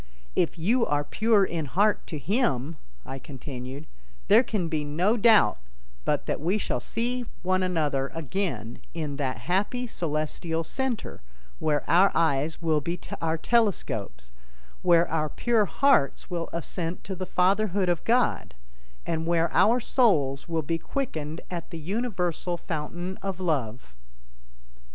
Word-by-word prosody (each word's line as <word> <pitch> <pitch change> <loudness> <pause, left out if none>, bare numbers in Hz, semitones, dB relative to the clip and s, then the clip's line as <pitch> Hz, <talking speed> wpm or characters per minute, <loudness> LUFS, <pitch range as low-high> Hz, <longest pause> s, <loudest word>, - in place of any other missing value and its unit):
"If 175 0 +1
you 225 +10 +2
are 145 0 +1
pure 215 +4 +3
in 165 -4 -3
heart 205 +9 +1
to 155 - -4
Him," 155 - 0 0.3
I 135 - -6
continued, 135 +1 -7 0.4
"there 215 +3 +8
can 210 -8 -2
be 155 -2 -1
no 170 +9 +1
doubt 220 - +5 0.5
but - - 0
that - - -2
we 180 +7 +1
shall 125 - -1
see 240 - -2 0.2
one 185 +1 +2
another 150 -7 0
again 165 - -3 0.2
in 150 -4 -3
that 135 -3 -2
happy 205 +7 0
celestial 160 -3 -2
center 255 +5 -3 0.4
where 150 -1 0
our 185 +4 +5
eyes 160 0 +1
will 155 -2 +2
be 170 +4 -3 0.2
our 165 0 0
telescopes, 165 - 0 0.5
where 170 -1 +5
our 155 -1 0
pure 230 +2 +2
hearts 200 - +2
will 170 -1 -2
assent 170 +1 -4
to 195 - -5
the 185 0 -5
Fatherhood 195 +1 +2
of 175 -2 0
God, 245 +2 +1 0.5
and 165 -1 -2
where 170 -1 +2
our 235 +4 +5
souls 165 - +2
will 165 -1 0
be 165 +3 -1
quickened 160 - -4
at 170 -2 -5
the 170 - -6
universal 180 -2 -2
fountain 175 +2 -4
of 195 -2 -4
Love." 125 - -2
170 Hz, 140 wpm, -27 LUFS, 150-200 Hz, 0.5 s, there